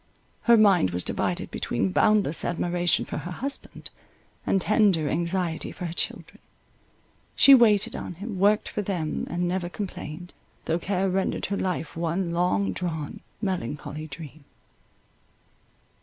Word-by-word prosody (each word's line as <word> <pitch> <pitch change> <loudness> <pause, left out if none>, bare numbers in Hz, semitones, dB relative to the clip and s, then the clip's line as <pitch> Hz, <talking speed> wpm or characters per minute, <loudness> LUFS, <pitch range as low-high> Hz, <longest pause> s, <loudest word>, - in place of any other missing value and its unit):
Her 235 - +8
mind 195 - +5
was 90 0 -2
divided - - -2
between 95 - -1
boundless 205 - +2
admiration 175 0 +1
for - - -5
her 155 +4 -5
husband, 270 +10 -5 0.6
and 195 - +3
tender 195 -6 +3
anxiety 170 +1 -1
for 180 - -6
her 165 - -4
children—she 275 +8 -1
waited 220 -6 +5
on 175 - -6
him, 200 +2 -6
worked 205 +2 +3
for 210 - -3
them, 180 -6 -3
and 175 0 -1
never 180 0 -2
complained, 175 -3 -7 0.3
though 165 +1 0
care 190 +1 0
rendered 190 +1 -1
her 200 - -2
life 180 -5 -3
one 170 +2 -1
long 100 - +1
drawn, 160 -4 -4 0.2
melancholy 155 - -3
dream. 150 0 -10
175 Hz, 130 wpm, -26 LUFS, 160-195 Hz, 0.6 s, Her